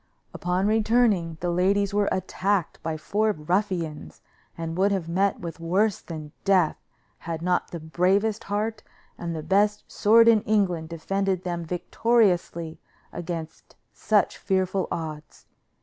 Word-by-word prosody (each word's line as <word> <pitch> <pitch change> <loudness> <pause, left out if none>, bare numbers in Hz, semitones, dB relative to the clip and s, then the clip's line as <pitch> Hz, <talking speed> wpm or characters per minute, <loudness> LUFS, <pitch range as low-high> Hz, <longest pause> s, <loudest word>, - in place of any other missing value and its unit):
Upon 180 +2 -1
returning, 215 -6 +2
the 175 0 0
ladies 195 +3 +2
were 205 0 +2
attacked 190 0 -1
by 160 -1 -3
four 210 +7 0
ruffians, 165 - -2 0.3
and 165 0 -4
would 195 +3 +2
have 190 -4 -1
met 190 +4 +1
with 170 -1 -7
worse 190 +5 +1
than 155 -3 -8
death 185 -5 +3 0.4
had 165 -1 -5
not 180 0 0
the 170 - -6
bravest 190 +7 +1
heart 215 +2 -2 0.3
and 170 -1 -5
the 155 - -5
best 205 +3 +2
sword 230 +2 +5
in 225 -2 +6
England 185 -7 0
defended 190 +2 -1
them 175 -2 -3
victoriously 180 -2 +1 0.3
against 165 -2 -6 0.2
such 210 -1 +1
fearful 190 -1 0
odds. 155 -2 -6
185 Hz, 135 wpm, -25 LUFS, 165-205 Hz, 0.4 s, in